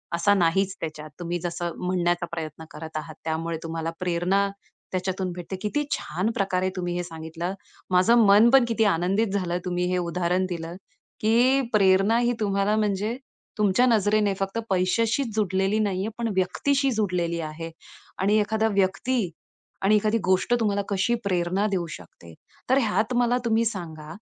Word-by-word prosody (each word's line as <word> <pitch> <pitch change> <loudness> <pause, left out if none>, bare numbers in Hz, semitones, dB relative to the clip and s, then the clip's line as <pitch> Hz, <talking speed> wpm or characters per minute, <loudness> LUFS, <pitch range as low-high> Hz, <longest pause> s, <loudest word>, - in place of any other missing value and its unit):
असा 205 +4 +3
नाहीच 190 +2 +2
त्याच्यात. 155 -1 -6
तुम्ही 175 0 -3
जसं 175 0 -3
म्हणण्याचा 175 -1 +1
प्रयत्न 160 -1 -6
करत 160 0 -7
आहात. 155 0 -6
त्यामुळे 165 +1 -2
तुम्हाला 165 0 -3
प्रेरणा 180 +3 +1 0.4
त्याच्यातून 185 0 -2
भेटते, 180 +2 -6
किती 295 +8 -1
छान 180 +9 -1
प्रकारे 185 -1 0
तुम्ही 175 -1 -2
हे 175 - -2
सांगितलं. 165 +2 -5 0.4
माझं 220 +5 +5
मन 205 +4 +7
पण 265 -3 +7
किती 225 -1 +1
आनंदित 195 +4 +2
झालं, 180 -3 -1
तुम्ही 180 0 -1
हे 180 - +1
उदाहरण 180 +1 0
दिलं, 170 0 -5 0.5
की 245 +5 +4
प्रेरणा 195 +2 +4
ही 240 0 +2
तुम्हाला, 200 0 +1
म्हणजे 210 +3 0 0.4
तुमच्या 210 +4 +3
नजरेने 210 -3 +3
फक्त 195 +3 -2
पैशाशीच 220 +6 +1
जोडलेली 195 0 +1
नाही 200 -3 0
आहे, - - -2
पण 235 -1 -1
व्यक्तीशी 270 +9 +1
जोडलेली 180 -6 -1
आहे 165 +1 -6 0.5
आणि 205 +3 +3
एखादा 220 +1 +1
व्यक्ती 195 +3 +1 0.5
आणि 210 +2 +5
एखादी 215 +2 +2
गोष्ट, 185 +5 +2
तुम्हाला 205 -2 +1
कशी 200 +4 +1
प्रेरणा 185 +1 0
देऊ 185 -4 -1
शकते. 85 -1 -15 0.4
तर 260 - +5
ह्यात 220 0 0
मला 245 0 +3
तुम्ही 230 0 +2
सांगा, 160 -7 -5
190 Hz, 155 wpm, -25 LUFS, 175-215 Hz, 0.5 s, मन